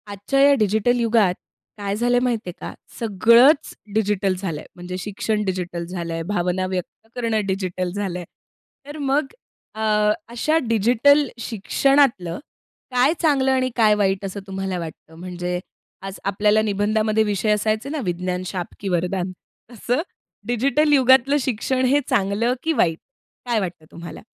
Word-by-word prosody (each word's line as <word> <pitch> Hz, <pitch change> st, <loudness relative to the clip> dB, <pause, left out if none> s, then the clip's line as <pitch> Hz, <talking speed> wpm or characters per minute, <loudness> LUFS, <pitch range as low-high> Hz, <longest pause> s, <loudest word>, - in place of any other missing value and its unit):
आजच्या 205 Hz, +7 st, -2 dB
या 280 Hz, 0 st, +7 dB
डिजिटल 220 Hz, +4 st, +2 dB
युगात 225 Hz, -5 st, +3 dB, 0.4 s
काय 200 Hz, -1 st, -3 dB
झालं 240 Hz, +3 st, +1 dB
आहे 245 Hz, -, +2 dB
माहिती 230 Hz, -6 st, -1 dB
आहे -, -, -6 dB
का, -, -, -7 dB, 0.3 s
सगळंच 235 Hz, -, +4 dB, 0.2 s
डिजिटल 205 Hz, -3 st, +1 dB
झालं 180 Hz, -5 st, -4 dB
आहे. -, -, -12 dB
म्हणजे 180 Hz, +1 st, -6 dB
शिक्षण 210 Hz, +2 st, -2 dB
डिजिटल 180 Hz, -2 st, -3 dB
झालं 170 Hz, -1 st, -5 dB
आहे, 165 Hz, 0 st, -3 dB
भावना 180 Hz, 0 st, -1 dB
व्यक्त 185 Hz, +3 st, -6 dB
करणं 230 Hz, -4 st, -1 dB
डिजिटल 185 Hz, -2 st, -2 dB
झालं 195 Hz, -2 st, -3 dB
आहे; 175 Hz, -, -7 dB, 0.6 s
तर 290 Hz, +2 st, -8 dB
मग 285 Hz, 0 st, +1 dB, 0.5 s
अ, 220 Hz, -, -5 dB, 0.5 s
अशा 245 Hz, +7 st, +1 dB
डिजिटल 245 Hz, +6 st, +4 dB
शिक्षणातलं 235 Hz, -4 st, +1 dB, 0.5 s
काय 250 Hz, +5 st, +4 dB
चांगलं 275 Hz, -5 st, +3 dB
आणि 260 Hz, -1 st, +1 dB
काय 220 Hz, -3 st, +5 dB
वाईट 195 Hz, -1 st, 0 dB
असं 195 Hz, +1 st, -5 dB
तुम्हाला 190 Hz, -1 st, -3 dB
वाटतं? 160 Hz, -1 st, -9 dB
म्हणजे 180 Hz, 0 st, -4 dB, 0.4 s
आज 195 Hz, 0 st, -7 dB
आपल्याला 210 Hz, +2 st, +2 dB
निबंधामध्ये 215 Hz, +1 st, +1 dB
विषय 210 Hz, 0 st, 0 dB
असायचे 215 Hz, +4 st, 0 dB
ना, 305 Hz, +1 st, -3 dB
"विज्ञान- 180 Hz, +1 st, -2 dB
शाप 180 Hz, -1 st, -5 dB
की 195 Hz, -, -4 dB
वरदान" 180 Hz, +1 st, -1 dB, 0.4 s
असं 245 Hz, +5 st, -1 dB, 0.5 s
डिजिटल 275 Hz, +5 st, +2 dB
युगातलं 265 Hz, +1 st, +5 dB
शिक्षण 255 Hz, +1 st, 0 dB
हे 275 Hz, +3 st, +4 dB
चांगलं 205 Hz, +5 st, +1 dB
की 325 Hz, -, +1 dB
वाईट, 165 Hz, -, +2 dB, 0.5 s
काय 240 Hz, -2 st, +1 dB
वाटतं 180 Hz, -5 st, -5 dB
तुम्हाला? 170 Hz, 0 st, -9 dB
210 Hz, 150 wpm, -22 LUFS, 185-245 Hz, 0.6 s, या